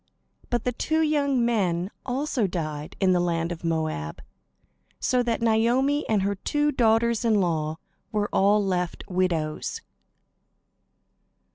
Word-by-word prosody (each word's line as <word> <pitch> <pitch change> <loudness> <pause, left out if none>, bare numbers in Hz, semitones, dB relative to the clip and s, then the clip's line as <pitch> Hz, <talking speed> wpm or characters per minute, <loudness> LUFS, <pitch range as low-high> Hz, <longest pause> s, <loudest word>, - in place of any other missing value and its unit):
But 240 -2 0
the 250 - 0
two 315 +6 0
young 280 -5 +2
men 190 -5 0 0.2
also 255 -3 0
died 155 -4 -4
in 190 -2 +3
the 180 - +3
land 170 -1 0
of 170 -1 -6
Moab; 155 - -2 0.8
so 250 -1 +2
that 235 -1 -1
Naomi 245 +6 +2
and 210 -3 +2
her 200 +1 +1
two 295 +9 0
daughters 235 -2 +2
in 225 -2 +3
law 160 -4 0 0.3
were 210 -1 0
all 205 +1 +4
left 180 -2 -2
widows. 175 -4 -1
205 Hz, 130 wpm, -25 LUFS, 170-240 Hz, 0.8 s, all